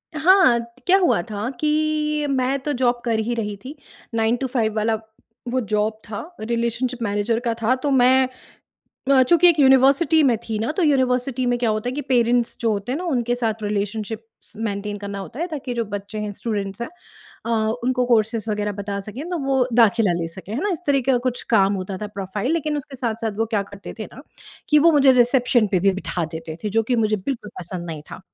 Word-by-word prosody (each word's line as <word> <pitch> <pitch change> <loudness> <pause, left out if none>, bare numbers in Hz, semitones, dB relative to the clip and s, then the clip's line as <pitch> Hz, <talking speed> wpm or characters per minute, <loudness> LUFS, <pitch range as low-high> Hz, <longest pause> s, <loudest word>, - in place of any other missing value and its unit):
हाँ, 310 -7 +5
त 235 +2 -11
क्या 380 +2 +6
हुआ 350 - +2
था 210 +3 -3
कि 305 -1 0
मैं 265 0 +1
तो 295 - -1
जॉब 245 -1 +1
कर 225 -2 +1
ही 235 +2 -1
रही 210 -3 -3
थी। 280 +4 -8 0.4
9 225 +1 +2
टू 265 - -2
5 225 -4 -1
वाला 220 +1 +1 0.6
वो 255 - +1
जॉब 215 +1 -1
था, 205 - -4 0.2
रिलेशनशिप 235 +2 -2
मैनेजर 205 +2 0
का 230 - +1
था। 245 +4 +3
तो 285 - +1
मैं 260 0 +5 0.8
अ, 265 -1 +6
चूँकि 345 +6 +5
एक 325 -3 +3
यूनिवर्सिटी 275 +4 +5
में 245 -5 +3
थी 215 -1 -1
ना, 225 +6 -1
तो 360 - -1
यूनिवर्सिटी 260 -3 +1
में 245 0 +1
क्या 235 -2 +1
होता 215 +3 -2
है - - -2
कि 290 - -2
पैरेंट्स 240 -2 +2
जो 230 -2 +1
होते 205 +5 -3
हैं - - -1
ना, 365 - -5
उनके 245 -7 0
साथ 225 -3 -2
रिलेशनशिप्स 210 +2 -4
मेंटेन 205 -1 -3
करना 200 0 -6
होता 225 - -8
है, 345 - 0
ताकि 275 -7 -5
जो 230 -1 -1
बच्चे 205 +1 -6
हैं, 210 -1 -3
स्टूडेंट्स 200 0 -4
हैं - - -4 0.6
अ, - - -2 0.3
उनको 250 0 +1
कोर्सेस 225 -1 +1
वग़ैरह 210 0 -1
बता 200 0 -4
सकें, 215 +8 -7
तो 350 - -1
वो 270 -2 +1
दाखिला 220 -3 +4
ले 165 - -2
सकें। 190 +4 -9
है 250 - -2
ना? 410 - 0
इस 335 - -3
तरह 275 -1 +3
का 265 -2 +4
कुछ 250 -1 -1
काम 200 -2 +4
होता 190 0 -4
था, 210 - -4
प्रोफ़ाइल, 205 - -3
लेकिन 305 -2 -1
उसके 275 -1 -7
साथ-साथ 225 -3 -2
वो 225 - +1
क्या 210 -3 0
करते 200 0 -10
थे 215 - -4
ना, 270 - -11 0.5
कि 300 - +5
वो 330 +2 +5
मुझे 275 -2 +6
रिसेप्शन 245 -2 +3
पे 180 - +3
भी 195 +1 +4
बिठा 175 -3 -3
देते 160 0 -6
थे, 210 - -1
जो 225 - +5
कि 245 - +3
मुझे 215 0 +1
बिल्कुल 210 +1 -5
पसंद 175 0 -6
नहीं 155 -3 -6
था। - - -7
235 Hz, 220 wpm, -22 LUFS, 210-265 Hz, 0.8 s, क्या